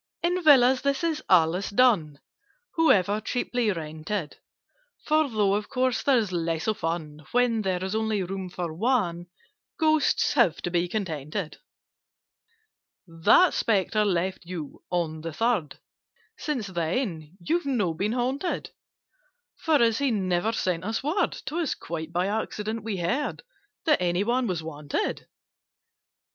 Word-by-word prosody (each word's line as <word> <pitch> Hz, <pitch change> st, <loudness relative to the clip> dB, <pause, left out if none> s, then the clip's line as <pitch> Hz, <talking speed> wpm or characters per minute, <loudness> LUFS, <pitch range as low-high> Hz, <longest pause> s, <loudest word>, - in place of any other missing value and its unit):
"In 355 Hz, +1 st, +1 dB
Villas 265 Hz, -4 st, +6 dB
this 280 Hz, +3 st, 0 dB
is 320 Hz, -2 st, 0 dB
always 180 Hz, +1 st, +3 dB
done— 200 Hz, -, +3 dB, 0.6 s
However 210 Hz, -, +3 dB
cheaply 245 Hz, -2 st, -1 dB
rented: 160 Hz, +1 st, -4 dB, 0.7 s
For, 310 Hz, -1 st, +2 dB
though 210 Hz, -4 st, +2 dB
of 205 Hz, +1 st, -2 dB
course 255 Hz, -3 st, 0 dB
there's 235 Hz, -8 st, +2 dB
less 165 Hz, -2 st, -1 dB
of 215 Hz, -1 st, -1 dB
fun 155 Hz, -2 st, -4 dB
When 245 Hz, -2 st, +2 dB
there 185 Hz, -2 st, -1 dB
is 190 Hz, +1 st, -3 dB
only 220 Hz, -2 st, 0 dB
room 190 Hz, 0 st, -5 dB
for 175 Hz, -2 st, -4 dB
one, 175 Hz, -4 st, 0 dB, 0.5 s
Ghosts 310 Hz, -4 st, +2 dB
have 235 Hz, -, +3 dB
to 175 Hz, -, -2 dB
be 175 Hz, 0 st, +1 dB
contented. 165 Hz, -3 st, -4 dB, 1.5 s
"That 165 Hz, -, +4 dB
Spectre 215 Hz, 0 st, +1 dB
left 185 Hz, -2 st, -1 dB
you 170 Hz, -4 st, -7 dB
on 160 Hz, -3 st, -2 dB
the 165 Hz, 0 st, -5 dB
Third— 225 Hz, -7 st, 0 dB, 0.6 s
Since 275 Hz, -8 st, -3 dB
then 170 Hz, -, -3 dB
you've 330 Hz, -, -1 dB
not 210 Hz, -11 st, +1 dB
been 210 Hz, +5 st, 0 dB
haunted: 260 Hz, +8 st, -2 dB, 0.9 s
For, 320 Hz, -2 st, +2 dB
as 230 Hz, -1 st, +2 dB
he 280 Hz, -1 st, +2 dB
never 190 Hz, -1 st, 0 dB
sent 180 Hz, -6 st, -1 dB
us 225 Hz, +5 st, -2 dB
word, 325 Hz, +8 st, 0 dB
'Twas 325 Hz, -1 st, -1 dB
quite 160 Hz, -1 st, -6 dB
by 175 Hz, +1 st, 0 dB
accident 215 Hz, +1 st, -3 dB
we 215 Hz, -3 st, -3 dB
heard 185 Hz, +12 st, -2 dB, 0.4 s
That 305 Hz, -, +3 dB
any 175 Hz, +2 st, +1 dB
one 245 Hz, +3 st, +1 dB
was 175 Hz, -5 st, -2 dB
wanted. 150 Hz, -, -3 dB
200 Hz, 135 wpm, -26 LUFS, 170-250 Hz, 1.5 s, Villas